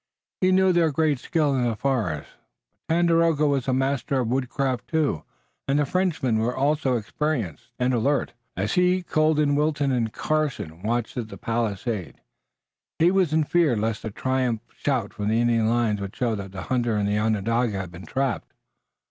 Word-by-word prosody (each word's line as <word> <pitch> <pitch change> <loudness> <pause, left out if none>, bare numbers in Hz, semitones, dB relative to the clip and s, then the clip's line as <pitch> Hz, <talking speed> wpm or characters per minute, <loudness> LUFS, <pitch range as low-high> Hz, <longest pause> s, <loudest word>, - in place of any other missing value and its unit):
He 185 0 +3
knew 190 0 +4
their 170 -2 +3
great 150 -2 +1
skill 150 -2 +1
in 125 - +1
the 120 -2 0
forest, 110 - -1 0.6
but 165 - +3
Tandakora 165 -3 +3
was 140 -3 0
a - - +2
master 135 0 0
of 120 -3 -1
woodcraft 130 0 -1
too, 150 - 0 0.4
and 135 +1 +2
the 145 - +2
Frenchmen 150 -9 0
also 135 +3 +1
were - - +2
experienced 115 - -3
and 125 +1 +1
alert. 135 +4 +1 0.2
As 100 +3 -1
he, 180 0 +3
Colden, 155 -3 +2
Wilton 145 -1 +1
and 115 -3 0
Carson 140 - -2
watched 115 +3 -2
at 120 -3 -3
the - - -9
palisade 115 -4 -3 0.8
he 170 +2 +4
was 185 -5 +2
in 155 0 +3
fear 160 -4 +2
lest 110 0 -2
a 110 - -3
triumphant 125 0 -2
shout 125 -8 -1
from 105 -1 -3
the 110 +2 +2
Indian 115 -2 +2
lines 115 -3 +1
would 100 0 -6
show 120 -3 0
that 100 -2 -5
the 95 -1 -6
hunter 120 -3 0
and 100 -1 0
the 105 +1 +1
Onondaga 110 +1 0
had 95 -3 -5
been 90 +2 -11
trapped. 135 -4 -2
125 Hz, 180 wpm, -25 LUFS, 110-150 Hz, 0.8 s, knew